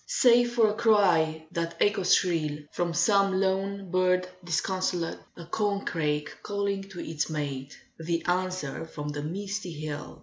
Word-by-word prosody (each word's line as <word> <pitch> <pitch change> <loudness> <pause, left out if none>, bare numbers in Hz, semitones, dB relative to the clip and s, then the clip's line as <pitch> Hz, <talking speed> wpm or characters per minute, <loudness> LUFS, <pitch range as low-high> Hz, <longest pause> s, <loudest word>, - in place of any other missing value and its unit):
Save 245 - +4
for 230 -2 +5
a 210 - +1
cry 175 -8 +3
that 170 -1 -3
echoes 200 -3 +4
shrill 160 -5 0
From 175 -1 -1
some 195 +3 +3
lone 195 0 -1
bird 185 0 +2 0.2
disconsolate; 175 0 -1 0.2
A 170 - -8
corncrake 165 -7 -1
calling 200 -1 -1
to 185 -2 -9
its 160 -1 -2
mate; 145 -3 -4 0.2
The 165 0 -2
answer 180 -5 -1
from 150 -2 -6
the 145 0 -4
misty 195 +3 -4
hill. 150 -1 -6
180 Hz, 140 wpm, -28 LUFS, 160-200 Hz, 0.2 s, for